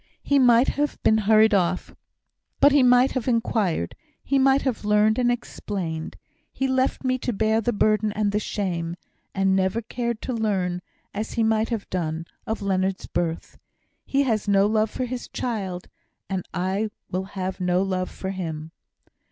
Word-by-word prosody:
He 285 -1 +3
might 245 0 +5
have 295 +1 -1
been 220 - +4
hurried 220 0 +6
off, 180 -2 0 0.7
but 285 - +6
he 285 0 +5
might 250 +1 +5
have 255 -2 -3
inquired 215 - 0 0.3
he 275 0 +1
might 270 +1 +4
have 255 -5 -2
learnt, 210 +2 +3
and 245 -1 +3
explained. 185 -9 -4 0.3
He 270 - -1
left 260 +1 0
me 255 0 0
to 245 - -2
bear 220 +1 +1
the 240 - 0
burden 215 -1 +2
and 210 -1 0
the 210 - +1
shame; 175 -6 -3 0.4
and 195 0 +2
never 190 +3 +1
cared 235 0 -3
to 255 - -3
learn, 190 -6 -1 0.3
as 215 +2 -4
he 230 - +1
might 220 0 +2
have 225 -4 -3
done, 165 -2 -2 0.2
of 220 -2 -3
Leonard's 190 -1 0
birth. 170 -2 -3 0.4
He 275 +1 +1
has 220 -6 0
no 200 -1 +4
love 215 +1 +2
for 255 - -3
his 250 0 -5
child, 195 -7 -4 0.4
and 190 -2 -3
I 190 +4 -1 0.2
will 185 +1 -2
have 190 -1 -5
no 180 +1 +2
love 185 -1 -2
for 190 - -5
him." 160 -4 -5
210 Hz, 170 wpm, -24 LUFS, 185-240 Hz, 0.7 s, hurried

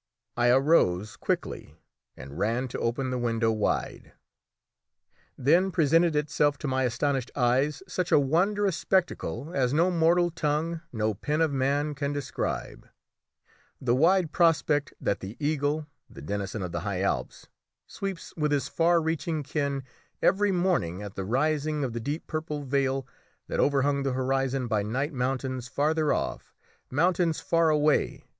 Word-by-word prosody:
I 120 0 +2
arose 120 - +3
quickly - - -3 0.4
and 70 +4 -9
ran 115 +5 0
to - - -5
open 130 +3 -1
the 125 - -1
window 115 -1 +1
wide. 110 -2 -2 1.2
Then 170 +9 +3
presented 165 -1 +3
itself 150 -1 +1
to 145 - -5
my 130 0 +1
astonished 130 +1 -1
eyes 135 +5 +1
such 180 -1 -2
a - - +7
wondrous 185 +7 +2
spectacle 170 -6 -1
as 130 -3 +1
no 170 +4 +3
mortal 175 +1 +3
tongue, 160 +1 -1
no 110 -2 0
pen 150 +10 -2
of 160 -2 +2
man, 140 +2 0
can 140 0 -2
describe 145 -1 -4 0.9
the 120 -2 +1
wide 165 +4 +3
prospect 155 -4 +2
that 100 - -1
the 100 +5 -8
eagle, 150 0 0 0.2
the 70 - -11
denizen 100 +4 -3
of 90 - -4
the 85 - -2
high 95 +1 -3
Alps, 100 - -2 0.4
sweeps 195 -3 -6
with 150 -2 0
his 140 -2 +1
far 170 +2 +3
reaching 160 -1 -2
ken 140 -1 -2 0.4
every 200 +2 +3
morning 175 - 0
at 100 -2 -7
the 95 - -4
rising 150 +5 0
of 125 -4 -2
the 120 - -3
deep 145 +7 -4
purple 155 -2 -4
veil 135 -1 0 0.4
that - - -3
overhung 140 0 +2
the 135 -1 -1
horizon 135 0 0
by 110 -3 +1
night 130 +9 -2
mountains 130 -1 -2
farther 150 +4 +1
off! - - -3 0.3
mountains 170 +3 +1
far 165 -1 +2
away! 150 -1 +1
145 Hz, 150 wpm, -27 LUFS, 125-160 Hz, 1.2 s, a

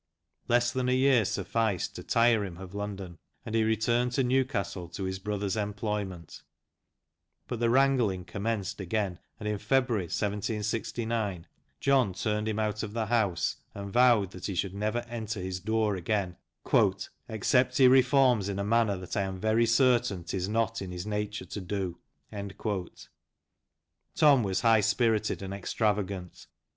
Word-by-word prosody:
Less 120 0 +3
than 125 0 -1
a 125 - +3
year 130 -3 +4
sufficed 110 -4 -1
to - - -6
tire 115 -2 +3
him 90 -4 -6
of 95 0 -10
London, 100 -4 -6 0.3
and 110 - -6
he 115 -1 +3
returned 115 +3 +1
to 135 - +2
Newcastle 110 - -1
to 95 - -6
his 95 0 -3
brother's 100 -1 -2
employment, 105 -4 -4 1.1
but 120 - -4
the 120 -1 +2
wrangling 120 -8 +2
commenced 100 +2 -3
again, 95 -1 -2 0.2
and 105 - -5
in 105 -1 -1
February, 120 -3 +1
1769, 105 0 -2 0.3
John 130 -8 +3
turned 105 +1 -1
him 110 -1 -1
out 105 -1 -1
of 105 -1 -5
the 115 -1 -1
house, 110 -6 0 0.2
and 100 -1 -6
vowed 120 -6 +4
that 90 -1 -6
he 100 - -3
should 95 +1 -1
never 110 +4 -2
enter 115 -2 -4
his 90 0 -4
door 110 +1 0
again, 95 0 -1 0.9
"except 120 +4 +2
he 130 - +7
reforms 125 -5 +4
in 100 - -3
a 100 - -1
manner 110 -1 +2
that 90 +2 -6
I 100 - +1
am 95 -1 -3
very 110 +3 +2
certain 120 -6 +3
'tis 90 +2 -3
not 115 0 0
in 95 - -5
his 90 +1 -5
nature 105 0 -3
to 105 - -6
do." 95 -2 -3 2.2
Tom 145 -4 +6
was 95 -3 -1
high 115 -2 +5
spirited 110 -1 +1
and 95 0 -5
extravagant. 100 -2 -2
105 Hz, 155 wpm, -29 LUFS, 95-115 Hz, 2.2 s, he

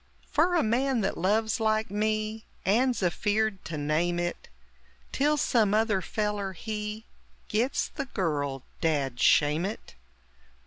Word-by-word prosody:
Fer 340 +4 +3
a 340 - +3
man 250 +2 +1
that 195 - -1
loves, 220 +6 +1
like 220 -2 +1
me, 215 +1 -1 0.2
And's 240 +3 +2
afeard 205 +3 0
to 160 - -4
name 155 +4 0
it, 175 0 -3 0.6
Till 295 +2 +2
some 220 -7 +2
other 215 -3 +2
feller, 205 0 -2
he 210 +3 -5 0.4
Gits 235 +6 +1
the 275 - -5
girl 145 - -2 0.2
dad 140 -7 0
shame 150 +5 +4
it! 205 +4 -5
210 Hz, 130 wpm, -28 LUFS, 175-225 Hz, 0.6 s, shame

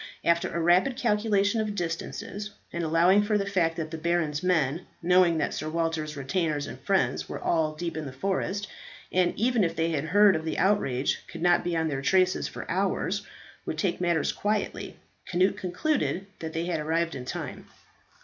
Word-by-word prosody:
After 170 0 +2
a 170 - -2
rapid 180 +10 +3
calculation 210 -2 +2
of 210 -1 -3
distances, 180 +4 -4 0.2
and 170 - -2
allowing 170 +5 +4
for 210 0 +1
the 200 - -1
fact 180 -5 +1
that 160 -1 -4
the 160 - -5
baron's 165 -3 0
men 170 -2 +1 0.2
knowing 180 -1 +4
that - - -1
Sir 155 - -3
Walter's 160 -2 -2
retainers 145 +1 -1
and - - -8
friends - - 0
were - - -5
all 155 -2 +1
deep 170 +1 -4
in 155 -2 -4
the - - -6
forest, 195 +6 -2 0.4
and 180 -1 +3
even 235 -1 +3
if 165 -1 0
they 165 0 0
heard 185 +7 +4
of 160 - -2
the 160 - -3
outrage 140 -10 +1
could 165 -1 -7
not 175 0 +4
be 175 -1 -1
on 160 0 +1
their 140 -3 -2
traces 185 +5 +2
for - - -7
hours - - -1 0.4
would - - -3
take 185 -4 -1
matters 170 -2 +1
quietly, 210 +1 -2 0.3
Cnut 185 +2 +3
concluded 190 - -1
that 160 -1 -5
they 165 +1 -2
had 175 -3 -1
arrived 165 +2 0
in 130 - -6
time. 125 - -6
170 Hz, 185 wpm, -27 LUFS, 160-195 Hz, 0.4 s, allowing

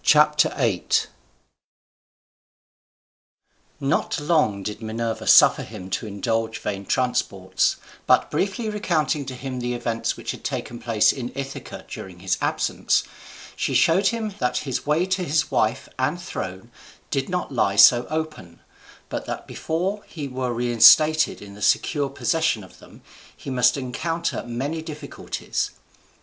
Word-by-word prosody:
Telemachus. 150 - +3 2.7
Not 140 +4 0
long 145 - +1
did 105 +2 -5
Minerva 115 +1 -3
suffer - - +7
him 95 -4 -9
to 110 - -2
indulge 110 +2 -2
vain 100 -1 -5
transports; 100 -7 0 0.3
but - - +4
briefly 200 +4 -1
recounting 160 -9 0
to 130 - -5
him 130 0 -5
the 125 0 -2
events 115 -1 -2
which - - -4
had - - -9
taken 120 - -4
place 115 -3 +3
in 125 -3 -5
Ithaca 140 0 -7
during 95 -2 -8
his 95 -1 -1
absence, - - +1 0.5
she - - -1
showed 190 +4 +4
him 220 -2 -1
that 125 -1 0
his 135 +1 -3
way 155 +4 +2
to 185 -1 -1
his 155 -2 0
wife 110 +5 +1
and 145 +7 0
throne 95 - -6 0.4
did 135 -2 -1
not 180 -3 -2
lie 100 -5 +1
so 120 +4 +7
open, 155 - -5 0.5
but - - -5
that - - -5
before 190 +6 -3
he 150 -4 -6
were 130 -1 -3
reinstated 125 +6 +5
in 100 -1 -11
the 105 - -13
secure 145 +4 +2
possession 160 - 0
of 95 - -16
them - - -17 0.3
he 135 - -7
must 125 +2 +3
encounter 165 +6 -2
many 140 +7 -3
difficulties. 155 -2 -4
130 Hz, 135 wpm, -23 LUFS, 115-155 Hz, 2.7 s, suffer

